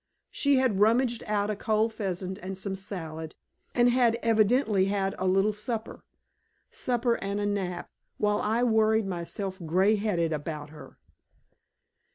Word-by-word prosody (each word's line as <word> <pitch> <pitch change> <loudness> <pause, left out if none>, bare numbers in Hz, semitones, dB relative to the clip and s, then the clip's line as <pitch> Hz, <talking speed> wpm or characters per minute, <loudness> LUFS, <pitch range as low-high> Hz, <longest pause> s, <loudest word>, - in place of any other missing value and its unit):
She 285 -1 +2
had 255 -7 +2
rummaged 235 +3 +3
out 210 0 0
a - - -2
cold 220 +2 0
pheasant 190 -2 -4
and 190 -1 -6
some 190 0 -4
salad, 160 -5 -6 0.4
and 240 0 +5
had 240 -2 +3
evidently 220 -2 +3
had 195 -1 0
a 190 - 0
little 195 +3 +3
supper. 220 +2 -5 0.7
Supper 240 -1 0
and 200 +1 -2
a 205 - -1
nap, 190 -4 -2 0.3
while 210 0 +1
I 225 +3 +1
worried 220 -2 +3
myself 190 +1 -4
gray 190 +6 +3
headed 175 -6 0
about 150 -1 -5
her! 155 - -13
205 Hz, 145 wpm, -28 LUFS, 190-225 Hz, 0.7 s, and